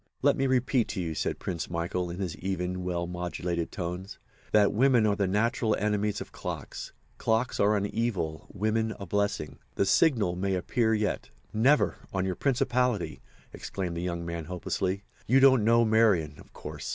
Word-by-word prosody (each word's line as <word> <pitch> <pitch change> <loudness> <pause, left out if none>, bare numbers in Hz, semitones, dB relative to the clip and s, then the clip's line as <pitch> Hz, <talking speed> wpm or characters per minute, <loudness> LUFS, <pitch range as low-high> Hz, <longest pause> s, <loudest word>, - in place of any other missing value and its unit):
"Let - - +5
me 135 - +1
repeat 130 -2 +2
to 100 - -4
you," 85 -3 -2
said - - -2
Prince 85 -4 -4
Michael, 85 +1 -2
in 85 - -5
his 95 -4 -3
even, 90 -1 -3
well 90 -1 -1
modulated 90 -1 -3
tones, 90 +2 -5 0.3
"that 105 -1 +4
women 120 0 +4
are 105 -1 +3
the 100 -2 0
natural 110 +3 +1
enemies 105 0 0
of - - -8
clocks. - - -6 0.3
Clocks 115 +2 0
are 105 +1 +4
an 100 - 0
evil, 100 -8 -2
women 110 +2 0
a 100 - -5
blessing. 100 -4 -1 0.2
The - - +2
signal 110 - +3
may 95 +2 -1
yet - - +1
appear." 110 -2 +1 0.4
"Never, 130 +7 +3
on 95 -1 -1
your 95 - 0
principality!" 125 -3 0 0.3
exclaimed 90 -3 -4
the 85 - -3
young 85 -1 -3
man, 85 -1 -4
hopelessly. 90 +2 -2 0.2
"You 130 +4 +5
don't 130 -4 +6
know 115 +1 +5
Marian—of 105 -10 +2
course. - - -7
100 Hz, 170 wpm, -28 LUFS, 90-110 Hz, 0.4 s, don't